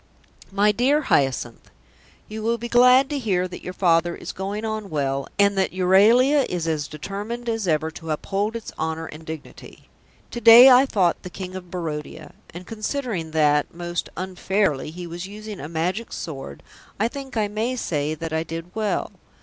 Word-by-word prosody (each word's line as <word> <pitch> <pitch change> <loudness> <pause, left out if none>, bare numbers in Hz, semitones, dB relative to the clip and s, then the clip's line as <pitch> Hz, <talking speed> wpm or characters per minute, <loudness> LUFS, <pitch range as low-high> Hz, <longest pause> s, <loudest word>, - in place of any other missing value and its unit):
"MY 205 +2 +3
DEAR 260 +8 +2
HYACINTH, 135 - 0 0.6
"You 215 +1 -6
will 230 +2 0
be 235 +1 -5
glad 250 +2 +6
to 290 - -1
hear 185 -7 0
that 180 - -9
your 180 - -6
father 175 -2 +2
is - - -7
going 200 +3 -4
on 215 -2 -4
well 140 -3 -1
and 200 0 +4
that 190 - 0
Euralia 220 +10 +5
is 175 -2 -2
as 155 -3 -1
determined 205 +10 -6
as 225 -4 -1
ever 160 0 +1
to 160 0 -10
uphold 200 +8 -2
its 230 - -6
honour 160 0 -2
and 155 0 -10
dignity. 160 -1 -10 0.4
To 240 - -5
day 240 +4 +10
I 255 +2 +6
fought 185 -8 +1
the 180 - -8
King 185 +1 -7
of 180 -1 -8
Barodia, 155 -3 -6 0.2
and 175 +2 -9
considering 220 - -3
that, 150 -1 +2
most 175 0 -4
unfairly, 185 -4 -1
he 175 +3 -8
was 170 +2 -6
using 210 0 -8
a 145 - -7
Magic 180 +8 -2
Sword, 135 - -7 0.4
I 220 - +2
think 270 0 -7
I 215 -1 +1
may 220 +5 -2
say 155 - -2
that 160 +1 -6
I 160 - +1
did 165 +2 -7
well. 215 -2 -1
185 Hz, 180 wpm, -23 LUFS, 160-220 Hz, 0.6 s, day